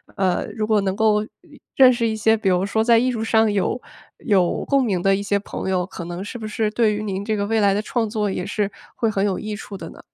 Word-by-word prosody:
呃， 185 -3 0
如 215 - -1
果 215 -1 +3
能 190 -1 -1
够 210 -1 +2
一 295 +6 -17 0.2
认 260 -1 +7
识 235 -2 0
一 220 - -1
些， 220 +1 +3
比 215 - -3
如 180 +1 +2
说 220 +2 0
在 230 0 +5
艺 255 +2 +1
术 225 -3 -3
上 220 -1 +3
有 205 +5 -1 0.4
有 185 -5 +1
共 275 -1 +2
鸣 190 -6 0
的 195 +1 +3
一 200 - -3
些 200 0 +1
朋 195 - -5
友， 180 -1 0
可 180 -2 -8
能 175 +2 -5
是 225 +4 -7
不 220 -2 -6
是 215 0 -1
对 220 -1 +2
于 210 +1 -3
您 195 -2 -3
这 220 0 0
个 200 -1 -1
未 225 +1 +1
来 200 -2 +4
的 205 - 0
创 225 0 -2
作， 210 -1 -1
也 180 - -3
是 205 0 -2 0.2
会 225 - 0
很 200 -2 0
有 195 -3 0
益 215 0 -5
处 205 -1 -9
的 - - -8
呢？ - - -14
210 Hz, 295 characters per minute, -22 LUFS, 195-225 Hz, 0.4 s, 认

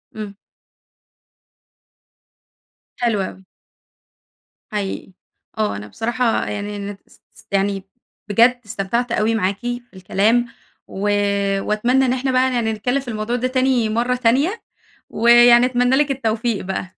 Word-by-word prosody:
امم. 210 -2 -7 2.6
حلو 230 -5 +1
أوي. 190 0 -7 1.3
حقيقي. 200 -2 -4 0.5
آه، 215 -1 0
أنا 100 +1 -7
بصراحة 235 - -1
يعني 205 0 -4
أنا 200 0 -6
اس - - -22 0.2
اس - - -13
يعني 195 0 0 0.5
بجد 235 +4 +4
استمتعت 225 +4 -2
أوي 225 0 +1
معاكِ 195 -2 -1
في 245 0 -4
الكلام، 205 +6 +1 0.4
و 190 - -8 0.6
وأتمنى 240 +7 +1
إن 250 - +1
إحنا 260 +1 -1
بقى 255 0 +2
يعني 230 -2 0
نتكلم 245 +6 -1
في 270 - -10
الموضوع 220 +1 -2
ده 250 +1 0
تاني 255 -3 +1
مرّة 240 +3 0
تانية، 265 - +1 0.5
ويعني 240 +1 +6
أتمنى 250 0 +2
لِك 290 0 +2
التوفيق 230 -5 -1
بقى. 185 -1 -5
230 Hz, 125 wpm, -20 LUFS, 205-250 Hz, 2.6 s, ويعني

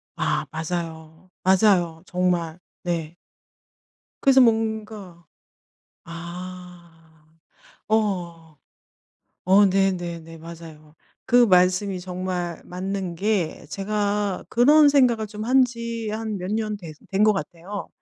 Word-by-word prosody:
아 - - -1
맞아요. 160 +1 -6
맞아요 185 -4 +3
정말. 180 -2 -1 0.2
네. 170 -2 -3 1.1
그래서 270 -1 +6
뭔가 220 -6 -1 0.8
아. 175 0 -9 1.0
어. 175 -7 -1 0.9
어 195 +3 +6
네네네. 175 -4 -1
맞아요. 160 -2 -12 0.3
그 245 -1 +6
말씀이 185 0 +3
정말 180 -1 -4
맞는 190 0 -4
게 195 -3 -1
제가 205 +1 -2
그런 290 +5 +6
생각을 250 -6 +3
좀 210 +1 -7
한 260 +2 +5
지 230 -2 -5
한 215 -1 -3
몇 180 +1 -5
년 215 -1 -1
된 170 -5 -9 0.2
된 195 +2 +3
것 215 - +5
같아요. 190 +2 -6
185 Hz, 175 characters per minute, -23 LUFS, 170-215 Hz, 1.1 s, 그래서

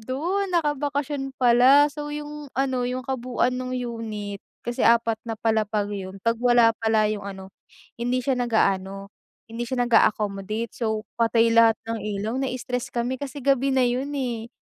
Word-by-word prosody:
dun, 340 - -2
nakabakasyon 290 -4 -1
pala. 255 +4 +6
So, 295 +1 -6
yung 295 -1 -7
ano, 265 -2 0
yung 255 0 -4
kabuuan 255 -1 -1
nung 255 0 -3
unit, 220 -4 -5 0.2
kasi 240 0 -4
4 230 -1 +3
na 225 - -3
palapag 215 -2 0
yun, 190 -1 -6
'pag 230 0 +3
wala 240 -2 +5
pala 220 -1 +3
yung 205 - -5
ano, 190 -1 -8 0.5
hindi 245 +1 0
siya 270 - +1
nag-aano, 195 -4 0 0.3
hindi 230 +1 -5
siya 245 -2 0
nag-a-accommodate. 215 -1 +1
So, 220 -2 -2 0.2
patay 230 0 +3
lahat 230 -1 +6
ng 225 0 -4
ilaw. 210 +1 -3
Na-stress 250 -2 -3
kami 245 +2 -3
kasi 280 -1 -6
gabi 275 -1 +3
na 255 - +4
yun 250 +3 -1
eh, 235 -4 -3
240 Hz, 155 wpm, -24 LUFS, 220-260 Hz, 0.5 s, pala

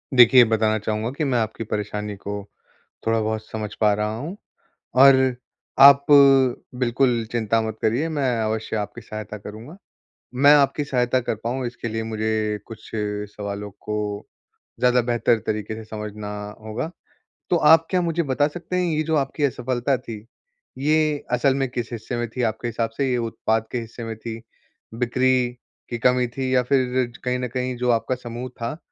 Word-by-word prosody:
देखिए 125 +1 +8
बताना 110 -1 +1
चाहूँगा 110 +2 -2
कि 145 +4 -3
मैं 130 -4 +1
आपकी 110 0 -3
परेशानी 105 -1 -4
को 100 +1 -6 0.6
थोड़ा-बहुत 110 -1 0
समझ 110 -1 -5
पा 105 -1 +5
रहा 105 +1 -1
हूँ, 165 - -6 0.6
और 130 -1 +6 0.4
आप 140 0 +9 0.7
बिल्कुल 120 -1 +1
चिंता 115 -1 +1
मत 110 -1 -4
करिए, 125 +9 +1
मैं 135 -5 0
अवश्य 110 0 -2
आपकी 105 +3 -5
सहायता 110 -1 -7
करूँगा। 110 - -10 0.6
मैं 140 +3 +7
आपकी 145 +1 +2
सहायता 125 -2 +1
कर 115 - -2
पाऊँ 125 +2 -2
इसके 120 -1 -6
लिए 110 0 -3
मुझे 110 -1 -1
कुछ 110 -1 -11
सवालों 105 -1 -4
को 105 -1 -4 0.5
ज़्यादा 125 0 +4
बेहतर 120 -1 +1
तरीक़े 110 0 -2
से 110 - -8
समझना 105 -1 -6 0.3
होगा। 110 +9 -4 0.6
तो - - +3
आप 160 +1 +6
क्या 185 -1 +2
मुझे 170 0 0
बता 145 0 +1
सकते 175 +4 -6
हैं 180 0 +1
ये 155 - +1
जो 160 0 0
आपकी 140 +1 -2
असफ़लता 130 0 -1
थी, 115 -4 -9 0.5
ये 150 +1 +1
असल 130 +2 +2
में 135 -1 0
किस 120 -1 -4
हिस्से 115 +2 -5
में 120 0 -2
थी 125 +3 -4
आपके 110 +1 -1
हिसाब 115 -1 -1
से 135 -2 +1
ये 125 - +1
उत्पाद 110 -1 -1
के 125 - -2
हिस्से 115 +1 -8
में 115 -1 -5
थी। 115 0 -7 0.6
बिक्री 130 +1 +2 0.6
की 120 - -3
कमी 125 0 +3
थी 130 -1 -1
या 125 - +4
फ़िर 125 -1 +1
कहीं 125 0 0
न 125 - -2
कहीं 125 0 -2
जो 125 0 -1
आपका 120 +2 0
समूह 120 +1 -7
था, 120 +5 -5
120 Hz, 170 wpm, -23 LUFS, 110-130 Hz, 0.7 s, आप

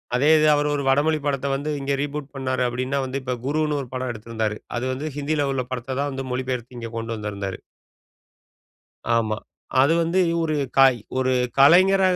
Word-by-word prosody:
அதே 140 +5 +3
இது, 155 0 +4
அவர் 145 0 +1
ஒரு 145 -1 -1
வடமொழி 150 +3 +3
படத்த 140 -1 -1
வந்து 145 +2 -3
இங்க 140 0 -1
ரீபூட் 145 -1 -4
பண்ணார் 130 -1 -1
அப்படின்னா, 130 +3 -2
வந்து 130 +1 -3
இப்ப 130 -1 -2
குருன்னு 150 +1 0
ஒரு 130 - -8
படம் 130 0 -3
எடுத்திருந்தாரு. 110 -1 -3 0.2
அது 120 - -3
வந்து 140 +4 -4
ஹிந்தியில 145 0 0
உள்ள 130 -1 -1
படத்த 130 +1 -4
தான் 145 0 0
வந்து 135 0 -5
மொழி 125 +1 -2
பெயர்த்து 125 -1 -4
இங்க 115 -1 -6
கொண்டு 115 0 -3
வந்திருந்தாரு. 100 -2 -5 1.6
ஆமா. 110 -2 0 0.4
அது 145 +4 +4
வந்து 170 +3 +1 0.2
ஒரு, 155 -2 0 0.6
ஒரு 130 0 +1 0.3
கலைஞர 185 +7 +6
135 Hz, 175 wpm, -23 LUFS, 125-145 Hz, 1.6 s, கலைஞர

